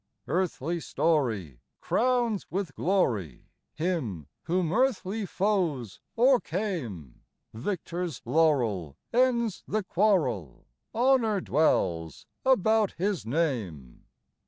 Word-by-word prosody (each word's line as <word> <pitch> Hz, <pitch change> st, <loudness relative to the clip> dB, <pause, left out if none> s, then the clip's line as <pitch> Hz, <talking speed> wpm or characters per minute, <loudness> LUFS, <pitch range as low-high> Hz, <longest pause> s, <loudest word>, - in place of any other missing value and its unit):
Earthly 170 Hz, -2 st, -1 dB
story 115 Hz, -, 0 dB, 0.2 s
crowns 240 Hz, -4 st, +1 dB
with 185 Hz, -6 st, -3 dB
glory 115 Hz, -, -1 dB, 0.2 s
Him 155 Hz, -, -2 dB, 0.2 s
whom 175 Hz, -1 st, 0 dB
earthly 225 Hz, -5 st, 0 dB
foes 175 Hz, -, -1 dB, 0.2 s
o'ercame; 180 Hz, -, 0 dB, 0.3 s
Victor's 170 Hz, -, -4 dB
laurel 115 Hz, -, +1 dB, 0.2 s
ends 235 Hz, -4 st, +2 dB
the 215 Hz, 0 st, -1 dB
quarrel, 160 Hz, -, 0 dB, 0.3 s
Honor 235 Hz, -3 st, +3 dB
dwells 85 Hz, -, 0 dB, 0.2 s
about 220 Hz, -4 st, +3 dB
His 185 Hz, -, -2 dB
name. 115 Hz, -, -2 dB
170 Hz, 85 wpm, -28 LUFS, -, 0.3 s, Honor